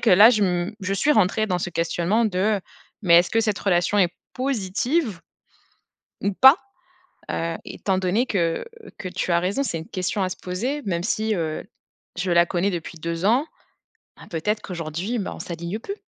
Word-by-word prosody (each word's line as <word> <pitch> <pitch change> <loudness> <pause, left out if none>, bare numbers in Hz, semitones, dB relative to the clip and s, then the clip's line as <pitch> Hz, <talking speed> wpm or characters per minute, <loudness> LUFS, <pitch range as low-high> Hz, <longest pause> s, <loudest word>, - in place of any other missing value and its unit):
que - - +3
là, 210 +6 +9
je 215 -4 +2
m 180 +2 -1
je 195 +1 -1
suis 285 +10 +2
rentrée 215 0 +2
dans 180 - +1
ce 175 - -3
questionnement 170 +6 +1
de: 200 +1 +1 0.4
«Mais 175 -4 +5
est-ce 175 - +2
que 225 - +2
cette 215 -2 0
relation 185 +1 +1
est 180 -3 +4 0.2
positive 245 - -1 1.0
ou 200 - 0
pas?» 265 +9 +8 0.7
Heu, 165 0 -2
étant 190 -2 -2
donné 190 +7 +1
que, 170 -6 0 0.4
que 185 - -5
tu 185 -1 -2
as 170 - +4
raison, 195 +10 0
c'est 165 -11 -2
une 160 - -9
question 185 +2 -2
à 185 - 0
se - - -5
poser, 245 +11 -3
même 170 -5 -1
si, 220 +3 0
heu, 160 -5 -2 0.5
je 180 0 -1
la 170 0 +5
connais 180 +2 0
depuis 170 -2 -5
2 170 +2 -3
ans, 250 +9 +3 0.7
ben, - - -13
peut-être 210 +6 -1
qu'aujourd'hui, 175 +6 -4
bah 195 - -4
on - - -11
s'aligne 170 +3 -5
plus. 395 - -6
185 Hz, 185 wpm, -23 LUFS, 175-215 Hz, 1.0 s, là